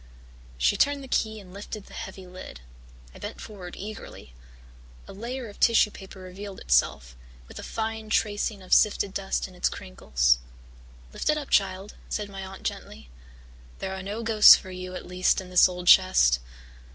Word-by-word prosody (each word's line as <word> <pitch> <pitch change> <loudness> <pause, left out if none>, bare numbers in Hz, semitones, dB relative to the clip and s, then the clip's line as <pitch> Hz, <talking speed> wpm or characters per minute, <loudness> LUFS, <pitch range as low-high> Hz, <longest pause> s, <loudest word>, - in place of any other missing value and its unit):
She 60 +1 +2
turned 285 -1 +2
the - - -9
key 220 -3 -1
and 185 -3 -14
lifted 205 +1 -8
the - - -16
heavy 190 0 -8
lid. 180 - -10 0.5
I - - -13
bent - - -7
forward 185 -5 -9
eagerly. 205 - -9 0.7
A - - -10
layer 240 +5 -5
of 205 - -13
tissue 225 -2 +4
paper 195 -1 -12
revealed 190 +2 -9
itself, 60 -1 +1 0.3
with - - -10
a - - -6
fine 220 -1 -4
tracing 205 -2 0
of 185 - -1
sifted 200 -2 +3
dust 195 -1 -2
in 185 - -16
its 180 - 0
crinkles. 60 0 0 0.7
"Lift - - -2
it 305 - +3
up, 290 -2 -6
child," 195 0 +1 0.2
said 210 -1 -3
my 195 -1 -7
aunt 190 0 -10
gently. 70 -3 -6 0.7
"There 190 - -4
are 190 - -5
no 205 +4 -5
ghosts 220 -2 +9
for 185 - -7
you, 185 0 -7
at 180 - -7
least, 180 +1 +1
in 185 -1 -9
this 180 0 +6
old 180 0 -7
chest." 180 - +6
190 Hz, 175 wpm, -26 LUFS, 180-215 Hz, 0.7 s, ghosts